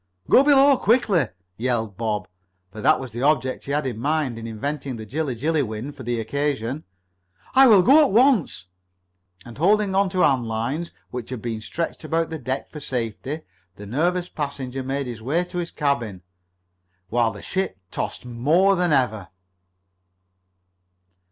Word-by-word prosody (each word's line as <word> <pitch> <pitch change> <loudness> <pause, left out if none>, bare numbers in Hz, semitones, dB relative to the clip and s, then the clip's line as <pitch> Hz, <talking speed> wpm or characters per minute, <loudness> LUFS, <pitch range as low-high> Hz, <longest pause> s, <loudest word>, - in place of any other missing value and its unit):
"Go 265 - +8
below 280 -1 +6
quickly!" 210 - +2 0.3
yelled 115 -4 -1
Bob, 105 -3 -2 0.4
for 110 +1 -8
that 155 +6 +4
was 130 -3 -7
the 120 +3 -5
object 135 -3 +1
he 140 - -5
had 145 0 0
in 120 -4 -3
mind 140 -3 -1
in 115 - -6
inventing 135 +4 -4
the 110 -1 -7
Jilla 140 +3 -2
Jilly 155 +6 +1
wind 120 +3 -5
for - - -10
the 120 0 -2
occasion. 140 +2 -2 0.7
"I 265 0 +7
will! 225 - +8
I'll 190 - +7
go 295 - +7
at - - -1
once!" 225 - +3 0.8
And, 120 +2 -11
holding 200 +3 +3
on 195 0 +3
to 185 0 0
hand 130 -4 +3
lines 125 +10 -2 0.2
which 125 -2 -6
had 125 -2 -4
been 115 -2 -3
stretched 160 +13 -4
about 165 +1 -1
the 160 - -4
deck 130 +1 -4
for 150 - -7
safety, 130 +3 -4 0.3
the 105 - -10
nervous 175 - 0
passenger 135 -5 -4
made 135 +1 -2
his 120 -3 -7
way 150 +9 0
to 180 0 -5
his 170 -1 -3
cabin, 120 - -2 0.9
while 120 -1 +2
the 100 -1 -11
ship 190 - -2
tossed - - -4
more 155 +12 +3
than 180 -2 +1
ever. 110 - +1
140 Hz, 170 wpm, -23 LUFS, 115-170 Hz, 0.9 s, Go